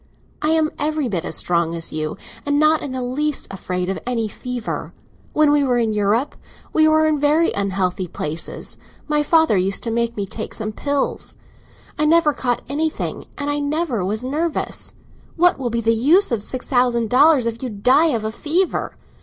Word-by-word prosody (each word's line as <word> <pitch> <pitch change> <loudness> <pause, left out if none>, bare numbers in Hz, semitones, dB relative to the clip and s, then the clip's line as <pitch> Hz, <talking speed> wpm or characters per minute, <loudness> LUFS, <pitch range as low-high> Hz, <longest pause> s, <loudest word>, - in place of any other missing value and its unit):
I 305 - +1
am 315 -1 +2
every 305 -2 0
bit 185 -7 -2
as - - -3
strong 170 -1 0
as 165 0 -4
you, 155 0 -3 0.3
and 285 0 +1
not 310 +1 +4
in 280 - -5
the 255 -1 -3
least 290 +4 -1
afraid 180 -1 -3
of 190 - -2
any 235 -3 -1
fever. 245 +2 -5 0.4
When 305 -1 +4
we 295 -1 +3
were 250 -3 +2
in 225 -2 +1
Europe, 210 +6 +1 0.4
we 315 0 +5
were 315 0 +4
in 310 -2 +2
very 300 +3 +3
unhealthy 190 -2 -1
places; 160 0 -4 0.3
my 300 -1 +2
father 320 -4 +4
used 190 +1 0
to 230 - -2
make 235 0 -1
me 200 - -1
take 215 +3 -6
some 215 -1 -3
pills. 285 +5 -2 0.6
I 300 - +3
never 315 -1 +4
caught 245 -3 -1
anything, 305 +4 -2
and 285 0 -2
I 290 - -1
never 290 - -1
was 215 +5 -2
nervous. 305 +5 -3 0.4
What 355 -3 +3
will 250 -2 -1
be 235 0 -1
the 230 0 +3
use 305 - +4
of 230 -3 0
six 250 +4 -4
thousand 245 -3 +2
dollars 275 0 +5
if 230 0 -3
you 255 - -3
die 250 +10 +3
of 230 -8 0
a 220 - -2
fever? 330 +10 -1
250 Hz, 190 wpm, -21 LUFS, 215-300 Hz, 0.6 s, we